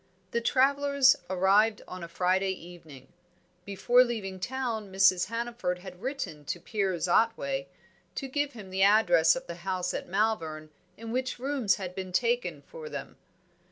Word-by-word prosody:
The 235 - 0
travellers 280 +2 +4
arrived 200 +4 +3
on 185 -1 -8
a - - -5
Friday 185 +3 +1
evening. 165 -7 -13 0.6
Before 220 +6 +4
leaving 205 -6 -4
town 235 -3 -3
Mrs. 190 -2 +4
Hannaford 230 -4 -3
had 180 0 -11
written 255 - -4
to 175 - -3
Piers 190 -2 -1
Otway 140 -10 +1 0.5
to 270 - -4
give 285 +1 -1
him 200 -5 -10
the 190 +1 -1
address 200 -5 +5
of 260 0 -6
the 170 - -7
house 185 -1 -2
at - - -4
Malvern 165 -7 -1 0.3
in 225 0 -7
which 255 +2 -2
rooms 260 -5 +1
had 185 -3 -6
been 185 0 -6
taken 475 - 0
for 475 -1 -10
them. - - -7
200 Hz, 155 wpm, -28 LUFS, 180-245 Hz, 0.6 s, address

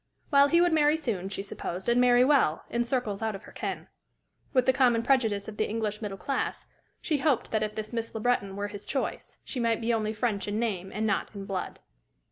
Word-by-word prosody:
Well, 280 0 +7
he 335 +3 +4
would 350 -1 +3
marry 300 0 +4
soon, 210 - -3
she 195 0 -4
supposed, 185 -2 -5
and 240 +1 +4
marry 245 0 +6
well, 260 - +3
in 240 0 +1
circles 235 -5 -2
out 220 -2 -1
of 195 - -9
her - - -13
ken. - - -5 0.6
With 255 -2 +3
the 260 - +4
common 240 -3 +3
prejudice 225 -7 +2
of 215 -1 -8
the - - 0
English 215 -1 -2
middle 200 -3 -4
class, 275 +7 -2 0.4
she 300 -4 0
hoped 265 -5 +1
that 220 - +1
if 215 0 -2
this 215 +1 -5
Miss 230 -1 -3
Le - - -2
Breton 215 -4 0
were 205 +1 -3
his 205 -1 -9
choice, 270 - -3
she 260 - -4
might 230 -2 +1
be 235 +1 0
only 215 -1 0
French 215 -3 -1
in 205 +1 -1
name 195 -5 -2
and 215 +2 -2
not 205 -2 0
in 200 -1 -6
blood. 190 -2 -4
225 Hz, 230 wpm, -28 LUFS, 205-250 Hz, 0.6 s, Well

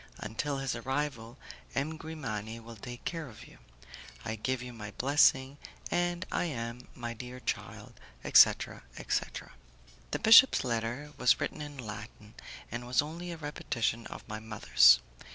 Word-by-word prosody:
Until 125 +7 -3
his 135 -2 -2
arrival, 130 -1 -3 0.4
M. 150 +4 -1
Grimani 115 -9 -5
will 115 0 -11
take 120 +3 -9
care 165 -3 -3
of 110 - -13
you. - - -17 0.7
I 110 - -2
give 125 +3 -2
you 125 -1 -8
my 105 -2 -7
blessing, 135 0 +3 0.3
and 175 0 0
I - - 0
am, 120 -5 -5
my 120 -1 -5
dear 125 +2 -8
child, - - -5 0.3
etc., - - +5 0.2
etc." - - -3 0.6
The - - -1
bishop's 230 +4 +8
letter 120 +4 -3
was 125 - +4
written - - -3
in 145 -1 -7
Latin, 105 -2 -9 0.4
and 120 +1 -5
was 125 +2 +3
only 170 +4 -6
a 170 - -6
repetition 120 -6 -2
of - - -10
my 110 0 -5
mother's. 60 - +5
125 Hz, 150 wpm, -31 LUFS, 115-145 Hz, 0.7 s, bishop's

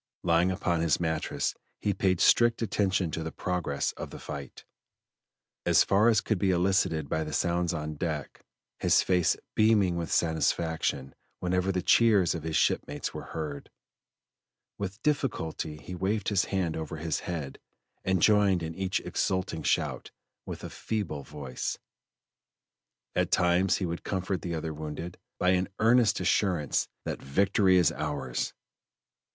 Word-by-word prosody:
Lying 85 +1 +3
upon 90 -3 0
his 80 -3 +2
mattress 80 -2 -1 0.3
he 100 - 0
paid 95 -2 +1
strict 120 0 +4
attention 95 -5 0
to 80 - -3
the 80 0 -4
progress 90 -6 -2
of - - -7
the - - -9
fight, 70 -3 -8 1.0
as - - +5
far 105 +4 +4
as 110 -3 +3
could 110 -5 -1
be 95 - +2
elicited 90 -4 +2
by 80 +3 -1
the 75 - -6
sounds 85 0 +1
on 75 -2 -4
deck 80 -2 -4 0.4
his - - +4
face 90 -3 +2 0.2
beaming 105 -5 +3
with 85 -1 -3
satisfaction 80 -4 0 0.2
whenever 90 +1 0
the 90 -1 -2
cheers 105 -6 +4
of 85 - -4
his 80 0 -3
shipmates - - 0
were - - -6
heard; 75 -3 -6 1.1
with 100 0 -4
difficulty 90 - -1
he 90 - -9
waved 95 +3 -1
his 100 -3 +2
hand 90 -5 -1
over 80 +1 -5
his 75 -1 -2
head 80 -6 -5 0.4
and 95 -3 +1
joined 100 -4 +4
in 80 0 -4
each 95 +1 -1
exulting 95 -3 -1
shout - - -1 0.4
with - - -6
a - - -5
feeble 100 -10 -3
voice. 70 -3 -5 1.4
At - - +1
times 90 +1 +3
he 95 - -2
would 85 0 -4
comfort 95 -1 -2
the 85 -2 -3
other 80 0 -3
wounded 80 +3 -6 0.2
by 90 - +2
an 95 +1 +2
earnest 115 -2 +4
assurance 90 -4 +1 0.2
that - - -4
"victory 95 +6 +3
is 85 -4 +4
ours!" 75 -2 -3
90 Hz, 150 wpm, -28 LUFS, 80-95 Hz, 1.4 s, as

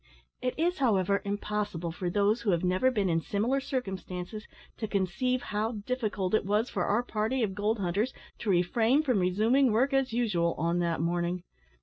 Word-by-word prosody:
It 250 0 -1
is, 345 +1 +1
however, 200 -6 +2
impossible 205 -4 -2
for 180 +1 -3
those 205 +5 +2
who 230 - -1
have 170 -2 +2
never 185 +8 +3
been 210 -6 0
in 165 -2 +1
similar 225 +10 0
circumstances 195 -5 -5 0.3
to 220 - -3
conceive 215 +6 0
how 215 +3 0
difficult 215 -7 -2
it 215 - +3
was 210 +4 0
for 180 - -1
our 230 +4 +2
party 225 +2 -1
of 200 -3 -1
gold 210 +3 0
hunters 200 +6 0 0.3
to 220 - -3
refrain 225 - +3
from 250 -8 +2
resuming 220 +8 +3
work 260 +6 +2
as 270 -2 +2
usual 210 -8 +1
on 170 +2 0
that 170 -2 0
morning. 175 +1 -1
210 Hz, 180 wpm, -29 LUFS, 180-245 Hz, 0.3 s, never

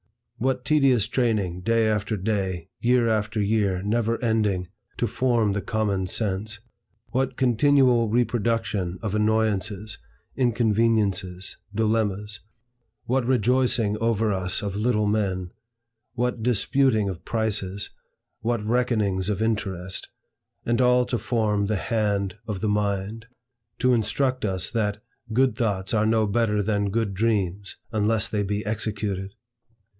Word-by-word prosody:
What 130 +1 0
tedious 135 -8 +4
training, 110 -8 0
day 115 +2 +2
after 105 0 0
day, 95 -4 -2
year 120 0 +3
after 110 0 0
year, 100 -3 +1
never 115 +2 0
ending, 105 -6 +1 0.3
to - - +1
form 115 -2 +1
the 100 - -1
common 100 -2 -1
sense; 105 +2 -2 0.5
what 130 0 -1
continual 125 -2 +4
reproduction 110 -5 0
of 105 -3 -2
annoyances, 105 -1 0 0.4
inconveniences, 110 -6 +1 0.2
dilemmas; 105 -2 0 0.7
what 125 0 0
rejoicing 125 -3 +2
over 115 -2 +1
us 90 0 0
of 100 -1 -3
little 105 0 +1
men; 95 -4 -1 0.6
what 125 -1 -1
disputing 120 -1 +2
of 90 -3 -5
prices, 105 -3 -1 0.5
what 115 -2 -1
reckonings 110 -5 +1
of 105 -2 -1
interest, 95 -5 -2 0.6
and 120 +2 +1
all 125 0 +4
to 120 -1 -2
form 105 -4 0
the 110 - 0
Hand 100 -2 -1
of 105 -4 -4
the 110 - 0
mind; 105 +2 -1 0.5
to 125 +1 +3
instruct 130 +3 0
us 95 -2 -1
that 105 -3 -1 0.3
"good 130 0 +2
thoughts 100 -4 -1
are 110 -1 +2
no 110 -1 +3
better 105 -1 +1
than 100 -1 0
good 110 -1 -1
dreams, 100 -2 -1 0.2
unless 110 +1 +2
they 105 -2 -1
be 105 +1 -2
executed!" 105 -2 -3
110 Hz, 125 wpm, -25 LUFS, 100-115 Hz, 0.7 s, tedious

